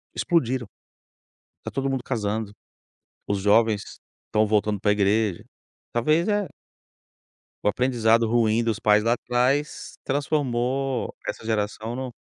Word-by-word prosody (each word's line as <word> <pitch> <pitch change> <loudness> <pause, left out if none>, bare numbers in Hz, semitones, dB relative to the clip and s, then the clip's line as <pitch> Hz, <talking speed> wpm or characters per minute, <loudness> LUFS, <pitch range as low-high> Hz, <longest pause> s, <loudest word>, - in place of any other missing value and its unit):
explodiram. 130 -8 0 0.9
Está - - -6
todo 135 +1 -1
mundo 135 -2 -2
casando, 110 -4 -2 0.8
os 100 -1 0
jovens 105 +1 +3 0.4
estão 110 0 +2
voltando 105 -1 +1
para 105 +2 +2
igreja. 105 -1 +1 0.5
Talvez 155 +9 +2
é 205 -3 +1 1.2
o - - +5
aprendizado 115 -1 +2
ruim 115 -1 +3
dos 115 -2 0
pais 105 0 +3
lá 115 - +4
atrás 125 +5 -1
transformou 135 -2 -1
essa 110 - -5
geração 110 +1 -2
no 130 -1 -4
115 Hz, 120 wpm, -24 LUFS, 105-130 Hz, 1.2 s, o